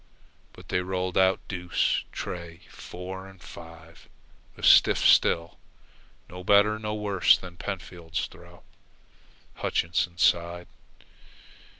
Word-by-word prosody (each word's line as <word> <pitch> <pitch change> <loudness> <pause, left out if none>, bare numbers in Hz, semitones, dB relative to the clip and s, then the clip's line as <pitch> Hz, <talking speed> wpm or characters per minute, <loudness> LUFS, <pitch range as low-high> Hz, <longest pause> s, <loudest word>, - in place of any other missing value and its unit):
But - - -16
they - - 0
rolled 90 0 -3
out 95 0 +2
deuce, 90 -2 -1
tray, 85 -1 -7
four, 95 +2 -9
and 95 -1 -16
five 80 -1 -14 0.5
a - - -13
stiff - - +6
still 85 0 +3 0.7
and 90 - -11
no 90 - -8
better 105 +2 +4
nor 105 0 -4
worse 100 -3 +3
than 90 -2 -11
Pentfield's 90 -4 -5
throw. - - -16 0.9
Hutchinson 85 +1 -1
sighed. 85 0 +1
90 Hz, 110 wpm, -26 LUFS, 85-95 Hz, 0.9 s, stiff